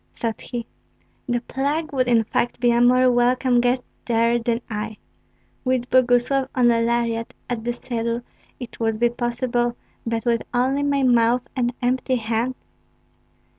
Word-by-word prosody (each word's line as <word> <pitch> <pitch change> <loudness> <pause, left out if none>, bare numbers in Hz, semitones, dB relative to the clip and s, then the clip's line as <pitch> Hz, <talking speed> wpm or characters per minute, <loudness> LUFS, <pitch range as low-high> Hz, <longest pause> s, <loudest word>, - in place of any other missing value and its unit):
thought 230 -2 -3
he; 240 -2 -5 0.6
"the 240 -1 0
plague 285 +5 -2
would 255 -2 +1
in 230 -2 +4
fact 240 +2 -1
be 240 0 +3
a 235 0 +3
more 255 +1 +5
welcome 245 0 +3
guest 245 +1 +1 0.2
there 230 0 +2
than 230 0 -1
I! 215 0 -5 0.7
With 255 -1 -1
Boguslav 255 +1 +3
on 245 -2 +4
a 230 0 +2
lariat 230 -1 -1
at 235 -3 -3
the 240 - -1
saddle 235 -1 -3 0.4
it 245 - -9
would 225 -1 0
be 240 0 +4
possible; 240 0 -1 0.3
but 230 0 -2
with 235 -1 +2
only 260 +3 +2
my 285 -1 +1
mouth 240 0 +3
and 245 -2 +1
empty 255 +1 +1
hands!" 230 +2 -1
240 Hz, 155 wpm, -22 LUFS, 235-255 Hz, 0.7 s, more